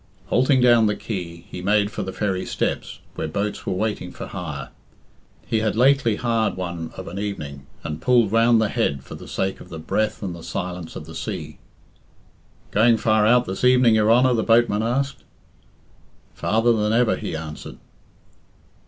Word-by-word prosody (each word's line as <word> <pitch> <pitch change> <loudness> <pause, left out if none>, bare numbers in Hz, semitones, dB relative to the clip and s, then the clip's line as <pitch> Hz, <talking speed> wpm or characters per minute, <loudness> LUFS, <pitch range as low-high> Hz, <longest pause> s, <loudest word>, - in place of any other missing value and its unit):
Halting 130 +1 +3
down 120 -3 +5
the 105 - 0
quay, 85 -6 -6
he 90 - -7
made 100 +2 +2
for - - -4
the 95 - -4
ferry 95 -1 -2
steps, - - -3
where - - -3
boats 100 +6 -3
were - - 0
waiting 95 -2 -2
for - - -7
hire. 75 -8 -6 0.8
He 110 - 0
had 110 -1 0
lately 125 -2 +4
hired 115 -3 0
one 85 -3 -4
of - - -7
an 95 - -5
evening, 75 -10 -5 0.2
and 75 0 -5
pulled 120 -5 +3
round 115 +1 +4
the 110 -2 +1
Head 70 -7 -1
for - - -11
the - - -10
sake 95 0 -2
of - - -13
the 80 - -7
breath 105 +8 -1
and 90 -3 -4
the 85 - -10
silence 90 -2 -5
of 75 - -7
the 80 - -10
sea. - - -6 1.1
"Going 115 +2 +4
far 110 -1 +3
out 125 +2 +4
this 95 +4 -5
evening, 125 -2 +5
your 110 0 +3
Honor?" 125 +2 +5
the 115 - +1
boatman 115 -2 +3
asked. 135 +5 -1 1.1
"Farther 115 +3 +2
than 105 -1 +1
ever," 120 -1 +3
he 100 -6 -5
answered. 80 -1 -7
105 Hz, 180 wpm, -23 LUFS, 90-115 Hz, 1.1 s, down